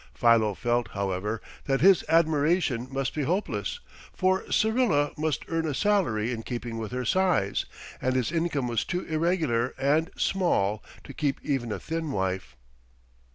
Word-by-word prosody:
Philo 115 Hz, -4 st, +4 dB
felt, 120 Hz, +1 st, 0 dB
however, 100 Hz, +2 st, -2 dB, 0.2 s
that 135 Hz, -1 st, +1 dB
his 190 Hz, 0 st, +6 dB
admiration 155 Hz, -5 st, +2 dB
must 135 Hz, 0 st, -2 dB
be 150 Hz, -, -2 dB
hopeless, 185 Hz, -, -1 dB, 0.3 s
for 190 Hz, 0 st, 0 dB
Syrilla 220 Hz, -, +2 dB
must 155 Hz, -4 st, -2 dB
earn 165 Hz, -1 st, -1 dB
a 145 Hz, -, -2 dB
salary 165 Hz, -, +1 dB
in 115 Hz, -2 st, -3 dB
keeping 120 Hz, -1 st, -5 dB
with 110 Hz, 0 st, -5 dB
her 125 Hz, 0 st, -3 dB
size, 180 Hz, -, +1 dB, 0.4 s
and 130 Hz, 0 st, 0 dB
his 130 Hz, +2 st, 0 dB
income 165 Hz, -6 st, 0 dB
was 115 Hz, -2 st, 0 dB
too 180 Hz, 0 st, -2 dB
irregular 155 Hz, -7 st, 0 dB
and 145 Hz, +5 st, +2 dB
small 110 Hz, -, +1 dB, 0.2 s
to 140 Hz, -, -10 dB
keep 140 Hz, -2 st, -1 dB
even 130 Hz, -5 st, -1 dB
a -, -, -2 dB
thin 160 Hz, -2 st, -3 dB
wife. 95 Hz, -, -2 dB
135 Hz, 155 wpm, -27 LUFS, 115-165 Hz, 0.4 s, his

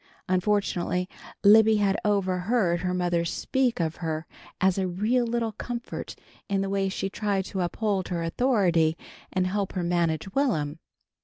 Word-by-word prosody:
Unfortunately 185 Hz, -1 st, 0 dB, 0.4 s
Libby 220 Hz, +1 st, +7 dB
had 200 Hz, -1 st, +2 dB
overheard 190 Hz, -1 st, +1 dB
her 180 Hz, +1 st, -1 dB
mother 175 Hz, -2 st, +1 dB
speak 250 Hz, +8 st, 0 dB
of 160 Hz, -1 st, -1 dB
her 160 Hz, -2 st, -3 dB, 0.3 s
as 190 Hz, 0 st, +2 dB
a 190 Hz, -, 0 dB
real 220 Hz, +7 st, +1 dB
little 230 Hz, -1 st, -1 dB
comfort 240 Hz, +2 st, -6 dB, 0.3 s
in 195 Hz, -1 st, +1 dB
the 195 Hz, 0 st, -2 dB
way 195 Hz, -1 st, +1 dB
she 190 Hz, -, -2 dB
tried 195 Hz, -1 st, -1 dB
to 190 Hz, -2 st, -3 dB
uphold 195 Hz, +1 st, -1 dB
her 170 Hz, -2 st, -2 dB
authority 170 Hz, -5 st, +2 dB, 0.3 s
and 185 Hz, -1 st, +1 dB
help 195 Hz, +1 st, -1 dB
her 180 Hz, -, -2 dB
manage 170 Hz, +1 st, 0 dB
Will'm. 165 Hz, -, 0 dB
190 Hz, 150 wpm, -26 LUFS, 175-210 Hz, 0.4 s, Libby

